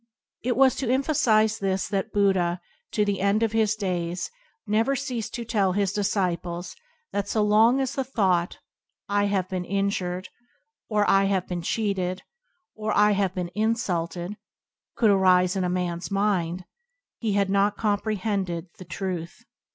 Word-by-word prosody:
It 245 Hz, 0 st, -1 dB
was 265 Hz, -2 st, +6 dB
to 260 Hz, -4 st, -2 dB
emphasize 230 Hz, -5 st, +2 dB
this 195 Hz, -1 st, -1 dB
that 195 Hz, -1 st, -2 dB
Buddha, 190 Hz, -4 st, +2 dB, 0.3 s
to 210 Hz, -, +2 dB
the 200 Hz, -2 st, -1 dB
end 200 Hz, +3 st, +2 dB
of 225 Hz, -, +1 dB
his 220 Hz, -1 st, +2 dB
days, 180 Hz, -, -3 dB, 0.3 s
never 225 Hz, +6 st, +1 dB
ceased 250 Hz, -5 st, -4 dB
to 235 Hz, -, -4 dB
tell 200 Hz, -5 st, +1 dB
his 200 Hz, -1 st, 0 dB
disciples 180 Hz, -4 st, -2 dB, 0.4 s
that 200 Hz, 0 st, -2 dB
so 215 Hz, -, +1 dB
long 220 Hz, +5 st, +4 dB
as 265 Hz, -2 st, -1 dB
the 270 Hz, -, -1 dB
thought 190 Hz, -9 st, 0 dB, 0.5 s
"I 205 Hz, 0 st, +2 dB
have 195 Hz, -3 st, 0 dB
been 185 Hz, -1 st, -3 dB
injured/' 185 Hz, -1 st, -2 dB, 0.6 s
or 210 Hz, -2 st, +2 dB
"I 195 Hz, 0 st, +4 dB
have 195 Hz, -2 st, 0 dB
been 175 Hz, -1 st, -3 dB
cheated," 190 Hz, -1 st, -1 dB, 0.5 s
or 215 Hz, 0 st, -3 dB
"I 210 Hz, 0 st, +5 dB
have 195 Hz, -2 st, 0 dB
been 180 Hz, -2 st, -3 dB
insulted," 185 Hz, -4 st, -1 dB, 0.6 s
could 220 Hz, -4 st, +4 dB
arise 185 Hz, -1 st, +4 dB
in 190 Hz, -, 0 dB
a 180 Hz, -, 0 dB
man's 175 Hz, -1 st, -2 dB
mind, 185 Hz, -3 st, 0 dB, 0.5 s
he 220 Hz, -3 st, -1 dB
had 200 Hz, -1 st, +1 dB
not 200 Hz, +1 st, +2 dB
compre 215 Hz, 0 st, 0 dB
hended 185 Hz, -4 st, -2 dB
the 185 Hz, -, -9 dB
Truth. 180 Hz, -2 st, -5 dB
200 Hz, 160 wpm, -25 LUFS, 180-215 Hz, 0.6 s, was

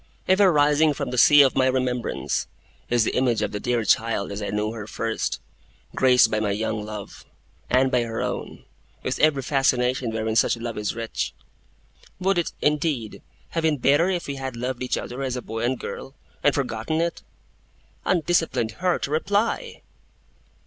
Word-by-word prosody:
Ever 190 Hz, 0 st, +5 dB
rising 150 Hz, 0 st, +3 dB
from -, -, -4 dB
the 125 Hz, -, -3 dB
sea 145 Hz, +2 st, +8 dB
of 135 Hz, -, +2 dB
my 130 Hz, -, +3 dB
remembrance, 125 Hz, -2 st, -1 dB, 0.4 s
is 120 Hz, -2 st, +3 dB
the -, -, -1 dB
image 125 Hz, -3 st, +1 dB
of -, -, -2 dB
the 105 Hz, -, -4 dB
dear 120 Hz, +1 st, 0 dB
child 110 Hz, -3 st, +1 dB
as 100 Hz, +1 st, -5 dB
I 105 Hz, -, -3 dB
knew 105 Hz, +1 st, -1 dB
her 110 Hz, -2 st, -7 dB
first, -, -, -2 dB, 0.5 s
graced 125 Hz, -3 st, +5 dB
by 110 Hz, -, +1 dB
my 105 Hz, -1 st, 0 dB
young 110 Hz, +1 st, -2 dB
love, 105 Hz, -1 st, -8 dB, 0.5 s
and 130 Hz, +1 st, +3 dB
by 125 Hz, -2 st, +3 dB
her 115 Hz, -1 st, -4 dB
own, -, -, -4 dB, 0.4 s
with 130 Hz, -, -2 dB
every 150 Hz, -3 st, +3 dB
fascination 130 Hz, -2 st, +1 dB
wherein 110 Hz, 0 st, -2 dB
such 115 Hz, -, +3 dB
love 115 Hz, -1 st, -5 dB
is 105 Hz, 0 st, -2 dB
rich. 115 Hz, -1 st, -3 dB, 0.8 s
Would 190 Hz, -1 st, +2 dB
it, 170 Hz, -, -2 dB
indeed, 150 Hz, -7 st, 0 dB, 0.3 s
have 165 Hz, -, -2 dB
been 160 Hz, -2 st, +2 dB
better 145 Hz, +7 st, +3 dB
if 180 Hz, -2 st, -1 dB
we 140 Hz, -1 st, -5 dB
had 135 Hz, -2 st, -5 dB
loved 125 Hz, +1 st, -4 dB
each 125 Hz, -, -1 dB
other 125 Hz, +3 st, -6 dB
as 130 Hz, -2 st, -2 dB
a -, -, -2 dB
boy 110 Hz, +1 st, -5 dB
and 120 Hz, +3 st, +1 dB
a -, -, -7 dB
girl, 135 Hz, -, -7 dB, 0.3 s
and 145 Hz, -, +4 dB
forgotten 125 Hz, +3 st, -2 dB
it? 170 Hz, 0 st, -1 dB, 0.8 s
Undisciplined 165 Hz, -9 st, +1 dB
heart, 180 Hz, -1 st, +1 dB
reply! 205 Hz, -, -1 dB
130 Hz, 175 wpm, -24 LUFS, 115-150 Hz, 0.8 s, sea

